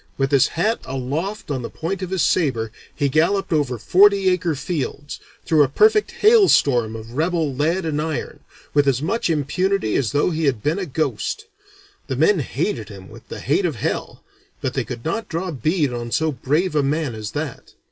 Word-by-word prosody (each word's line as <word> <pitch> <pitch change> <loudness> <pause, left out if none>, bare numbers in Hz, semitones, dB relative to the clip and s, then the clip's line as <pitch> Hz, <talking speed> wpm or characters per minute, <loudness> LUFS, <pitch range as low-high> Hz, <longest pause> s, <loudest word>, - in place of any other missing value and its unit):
With 135 0 0
his 140 -1 +5
hat 215 +7 +1
aloft 145 +10 -4
on 130 -3 -2
the 120 - -5
point 185 +4 -4
of 185 - -4
his 190 -2 0
saber 120 -11 +1 0.2
he 145 - +1
galloped 175 +7 +1
over 140 -5 0
forty 195 - +4
acre 175 -3 0
fields, 145 -1 -4 0.3
through 155 -2 +4
a 140 - +4
perfect 425 - +4
hailstorm 145 - +4
of 110 +1 -9
rebel 160 +1 0
lead 165 +7 0
and 150 -2 -1
iron, 155 -1 -4 0.3
with 145 -1 +3
as 130 -2 +3
much 180 +8 -1
impunity 165 - 0
as 125 -6 0
though 145 +5 +1
he 160 -1 -1
had 130 -7 0
been 160 +6 0
a 185 - -3
ghost. 150 - -2 0.6
The 130 - -2
men 160 +8 +3
hated 135 - -2
him 95 -2 -11
with - - -14
the - - -7
hate - - +1
of - - -1
hell, - - -4 0.4
but - - -3
they - - -1
could 120 -2 -7
not 220 +8 -2
draw 170 +2 -3
bead 150 - 0
on 120 -1 -4
so 160 +6 +1
brave 150 +7 0
a 150 - +4
man 145 -1 -1
as 110 -1 -6
that. 150 -3 -5
150 Hz, 195 wpm, -21 LUFS, 130-180 Hz, 0.6 s, his